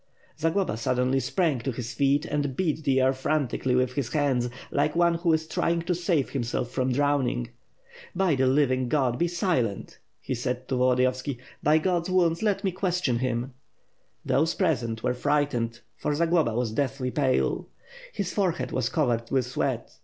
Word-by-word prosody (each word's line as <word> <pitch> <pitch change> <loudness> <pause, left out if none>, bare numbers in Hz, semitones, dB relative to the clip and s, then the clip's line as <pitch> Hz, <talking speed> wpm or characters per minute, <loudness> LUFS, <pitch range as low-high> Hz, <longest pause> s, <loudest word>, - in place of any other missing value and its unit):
Zagloba 165 - 0
suddenly 125 +3 +1
sprang 160 -2 0
to 130 +3 -2
his 120 0 -5
feet, 140 +3 +2
and 145 -4 -2
beat 160 -3 -1
the 135 -1 +3
air 130 +1 +3
fran 145 +2 0
tically 125 +1 -1
with 125 0 +1
his 130 -3 -2
hands; 135 -5 +1 0.2
like 150 - +1
one 170 0 +4
who 170 0 +1
is 160 0 +1
trying 170 +1 0
to 180 - 0
save 170 -5 0
himself 120 -2 -2
from 130 0 0
drowning. 135 - +1 0.7
"By 185 -2 +2
the 130 -1 +2
Living 130 -2 +2
God, 130 -4 +1
be 175 - +2
silent!^ 170 - -1 0.2
'he - - -4
said 125 +1 -3
to 130 - 0
Volodiyovski. 130 +1 +1 0.2
"By 150 +2 +4
God's 175 +1 0
wounds, 170 -3 +2
let 210 -3 0
me 190 - +1
question 180 -9 0
him!" 125 0 -2 0.7
Those 160 +4 +2
present 120 - 0
were 125 - +1
frightened, 125 -4 0 0.2
for 150 - -1
Zagloba 165 -7 +2
was 120 -2 0
deathly 130 0 -1
pale. 135 -2 +1 0.4
His 195 -3 -3
forehead 185 -5 0
was - - 0
covered 120 -7 0
with 130 -2 +1
sweat. 125 - -2
140 Hz, 170 wpm, -26 LUFS, 125-165 Hz, 0.7 s, one